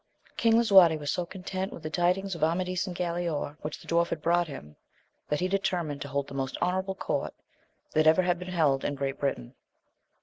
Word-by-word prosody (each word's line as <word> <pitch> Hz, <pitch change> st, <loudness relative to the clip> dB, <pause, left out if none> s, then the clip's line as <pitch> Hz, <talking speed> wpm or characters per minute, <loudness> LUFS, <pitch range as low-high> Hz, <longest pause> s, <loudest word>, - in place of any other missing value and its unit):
ING 225 Hz, -1 st, +5 dB
LISUAETE 190 Hz, -8 st, +6 dB
was 145 Hz, -1 st, -3 dB
so 175 Hz, -1 st, -2 dB
content 190 Hz, +1 st, -5 dB
with -, -, -10 dB
the 155 Hz, -, -3 dB
tidings 180 Hz, +4 st, +1 dB
of 165 Hz, -3 st, -4 dB
Amadis 180 Hz, +3 st, 0 dB
and 180 Hz, -, -5 dB
Galaor, 170 Hz, -4 st, -2 dB
which 150 Hz, 0 st, -5 dB
the -, -, -16 dB
dwarf 170 Hz, 0 st, +2 dB
had 165 Hz, -, -3 dB
brought 170 Hz, +2 st, +2 dB
him, 75 Hz, -, -9 dB, 0.5 s
that 150 Hz, +2 st, 0 dB
he 185 Hz, -, +2 dB
determined 175 Hz, -7 st, -1 dB
to 140 Hz, -, -4 dB
hold 140 Hz, 0 st, -2 dB
the -, -, -10 dB
most 135 Hz, -1 st, -3 dB
honourable 190 Hz, +2 st, -1 dB
court -, -, -3 dB, 0.6 s
that 155 Hz, 0 st, +3 dB
ever 160 Hz, +4 st, +5 dB
had 175 Hz, -1 st, +1 dB
been 180 Hz, -, -7 dB
held 150 Hz, -7 st, +2 dB
in 145 Hz, -, -1 dB
Great 135 Hz, 0 st, -3 dB
Britain. 135 Hz, -, -2 dB
170 Hz, 205 wpm, -28 LUFS, 145-185 Hz, 0.6 s, LISUAETE